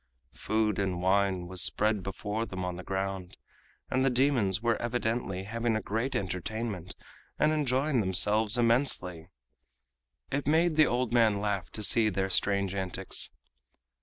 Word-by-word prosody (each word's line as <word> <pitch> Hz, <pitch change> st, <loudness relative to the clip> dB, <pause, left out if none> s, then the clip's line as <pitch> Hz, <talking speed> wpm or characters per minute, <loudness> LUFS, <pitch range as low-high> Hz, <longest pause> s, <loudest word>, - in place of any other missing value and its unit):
Food 110 Hz, -1 st, -1 dB
and 95 Hz, -3 st, -1 dB
wine 95 Hz, 0 st, +1 dB
was 90 Hz, 0 st, -4 dB
spread 105 Hz, 0 st, +2 dB
before 105 Hz, +4 st, -4 dB
them 95 Hz, -1 st, -5 dB
on 90 Hz, -1 st, -3 dB
the 90 Hz, -, -8 dB
ground, 95 Hz, -1 st, -4 dB, 0.5 s
and 130 Hz, 0 st, +2 dB
the 135 Hz, -, +3 dB
demons 125 Hz, -7 st, +2 dB
were 115 Hz, 0 st, 0 dB
evidently 115 Hz, -5 st, -2 dB
having 115 Hz, +2 st, -1 dB
a -, -, +1 dB
great 115 Hz, +6 st, -2 dB
entertainment 100 Hz, -1 st, -4 dB, 0.4 s
and 150 Hz, -, +3 dB
enjoying 140 Hz, -2 st, +1 dB
themselves 105 Hz, +3 st, +2 dB
immensely. 115 Hz, -, +1 dB, 1.0 s
It 140 Hz, 0 st, -2 dB
made 160 Hz, +2 st, +3 dB
the 155 Hz, -1 st, +5 dB
old 125 Hz, -1 st, -1 dB
man 110 Hz, -4 st, +3 dB
laugh 100 Hz, -3 st, -2 dB
to 105 Hz, -, -4 dB
see 110 Hz, +2 st, +3 dB
their 95 Hz, 0 st, -2 dB
strange 100 Hz, 0 st, +1 dB
antics. 95 Hz, -2 st, -1 dB
105 Hz, 145 wpm, -29 LUFS, 95-120 Hz, 1.0 s, the